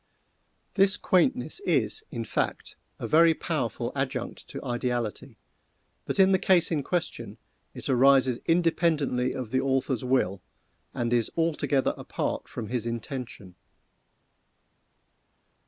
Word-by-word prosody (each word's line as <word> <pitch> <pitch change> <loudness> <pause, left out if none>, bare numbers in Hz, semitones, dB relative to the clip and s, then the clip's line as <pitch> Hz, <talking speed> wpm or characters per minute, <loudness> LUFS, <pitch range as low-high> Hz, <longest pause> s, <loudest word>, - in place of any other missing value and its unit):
This 195 0 +3
quaintness 250 - +1
is, 410 +2 0
in - - -5
fact, - - -2 0.2
a - - -5
very 165 +1 +5
powerful 125 -7 -2
adjunct 130 -3 -3
to - - -8
ideality, 120 -3 -3 0.7
but - - -3
in 190 0 +6
the 190 - +4
case 175 -3 +3
in 155 -3 +1
question 175 +4 -3 0.4
it - - -7
arises 130 -1 +4
independently 160 -7 +1
of 125 -4 -5
the 130 - +2
author's 130 -2 0
will, 115 -7 +1 0.5
and 120 0 -2
is 120 -2 +2
altogether 155 -4 +1
apart - - -3
from 110 -3 -6
his 120 -1 -2
intention. 115 -4 -6
130 Hz, 120 wpm, -27 LUFS, 120-165 Hz, 0.7 s, in